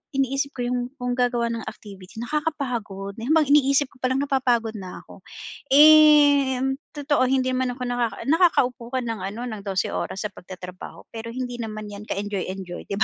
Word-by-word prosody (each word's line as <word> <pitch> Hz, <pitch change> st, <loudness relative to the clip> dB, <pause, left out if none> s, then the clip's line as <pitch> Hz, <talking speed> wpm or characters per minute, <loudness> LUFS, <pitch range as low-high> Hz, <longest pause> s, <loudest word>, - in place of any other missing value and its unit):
iniisip 275 Hz, +1 st, 0 dB
ko 245 Hz, -, -2 dB
'yong 250 Hz, 0 st, 0 dB, 0.2 s
kung 250 Hz, -2 st, -2 dB
gagawa 240 Hz, -2 st, +1 dB
ng 230 Hz, -1 st, -5 dB
activity, 195 Hz, -2 st, -13 dB
nakakapagod. 240 Hz, -9 st, -3 dB
'Yon 235 Hz, +4 st, -5 dB
bang 315 Hz, -1 st, +4 dB
iniisip 280 Hz, -1 st, +4 dB
ko -, -, -21 dB
palang, 255 Hz, +1 st, +1 dB
napapagod 250 Hz, -5 st, +1 dB
na 185 Hz, -2 st, -8 dB
ako. -, -, -15 dB, 0.5 s
Eh 295 Hz, -2 st, +7 dB
mm, 270 Hz, +2 st, -3 dB
totoo 290 Hz, -2 st, +2 dB
hindi 255 Hz, -1 st, +1 dB
man 255 Hz, -1 st, 0 dB
ako -, -, -13 dB
nakaka 240 Hz, -4 st, -1 dB
naka-upo 280 Hz, -7 st, +3 dB
ka 260 Hz, -, +1 dB
ng 225 Hz, -1 st, -3 dB
ano, 200 Hz, +5 st, -5 dB
ng 215 Hz, -3 st, -6 dB
12 190 Hz, -1 st, -1 dB
oras 190 Hz, -, -3 dB
sa -, -, -22 dB
pagtatrabaho. 180 Hz, 0 st, -10 dB
Pero 225 Hz, 0 st, -6 dB
hindi 250 Hz, -1 st, -4 dB
naman 215 Hz, -1 st, -6 dB
'yan 205 Hz, 0 st, -9 dB
ka-enjoy-enjoy, 190 Hz, -2 st, -4 dB
'di 200 Hz, -, -2 dB
ba? -, -, +5 dB
245 Hz, 180 wpm, -24 LUFS, 210-275 Hz, 0.5 s, Eh